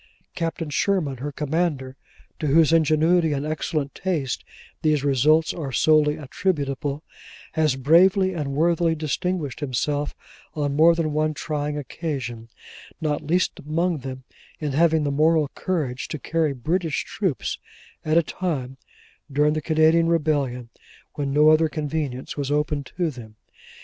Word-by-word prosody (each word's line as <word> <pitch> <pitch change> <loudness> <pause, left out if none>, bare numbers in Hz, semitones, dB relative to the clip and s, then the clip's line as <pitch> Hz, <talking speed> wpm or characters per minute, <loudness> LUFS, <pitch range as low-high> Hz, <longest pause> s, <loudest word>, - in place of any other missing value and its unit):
Captain 165 -2 -3
Sherman, 155 -6 0
her 145 +4 -5
commander, 145 -2 -2 0.4
to 155 - -1
whose 160 +2 +4
ingenuity 160 +1 +3
and 140 +1 -2
excellent 155 -2 -2
taste 160 -9 -2 0.4
these 155 -3 +2
results 150 +4 +3
are 145 -6 -5
solely 150 +2 +3
attributable, 145 -2 -2 0.5
has 155 -4 +1
bravely 185 +7 +4
and 145 -5 -3
worthily 165 +2 +2
distinguished 160 -1 -2
himself 145 +1 -2 0.4
on 145 -2 -1
more 165 +3 +6
than 160 -3 -1
one 155 0 0
trying 150 -1 -3
occasion: 130 -6 -5 0.5
not 150 -2 -1
least 175 +4 0
among 165 +2 -1
them, 130 0 -7 0.4
in 150 -2 -2
having 160 +2 +3
the 145 - 0
moral 155 +1 +3
courage 145 -10 -3
to - - -4
carry 160 0 0
British 160 +5 -1
troops, 185 - -2 0.4
at 155 +1 +2
a 170 - +5
time 140 -7 -3 0.5
(during 150 +2 +3
the 155 - -2
Canadian 160 +1 +3
rebellion) 145 -7 0 0.4
when 140 -2 -3
no 150 +2 +5
other 155 0 +4
conveyance 145 -3 -3
was 140 -2 -3
open 150 0 0
to 170 +3 -2
them. 115 -5 -11
150 Hz, 140 wpm, -23 LUFS, 140-165 Hz, 0.5 s, more